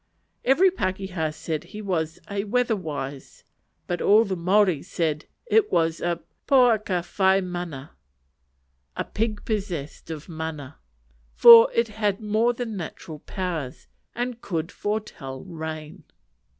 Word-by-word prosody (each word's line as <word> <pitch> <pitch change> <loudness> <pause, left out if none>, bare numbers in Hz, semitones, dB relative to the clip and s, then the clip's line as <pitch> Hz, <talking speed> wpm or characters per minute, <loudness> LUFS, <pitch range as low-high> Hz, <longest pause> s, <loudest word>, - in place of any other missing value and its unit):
Every 350 +9 +5
pakeha 185 - -2
said 155 0 -4
he 210 - -10
was 160 -5 -2
"weather 220 +4 0
wise;" 145 -6 -6 0.4
but 175 - -3
all 215 +3 +5
the 195 -2 -2
Maori 185 -2 +3
said 160 -5 -2 0.2
it 445 -3 +3
was 165 0 +1
a 170 -1 -1 0.3
"poaka 220 -9 +3 0.2
whai 190 0 +5
mana," 175 -7 -5 1.1
a - - 0
pig 215 -1 -3
possessed 180 -10 -4
of 155 -2 -7
mana; 160 - -6 0.6
for 230 -1 +10
it 230 -1 +2
had 210 -2 -1
more 220 +2 +2
than 240 -2 -5
natural 160 -3 -7
powers, 165 -8 -5 0.3
and 245 0 -3
could 165 -2 -3
foretell 205 -11 -4
rain. 160 -3 -7
185 Hz, 125 wpm, -25 LUFS, 160-215 Hz, 1.1 s, for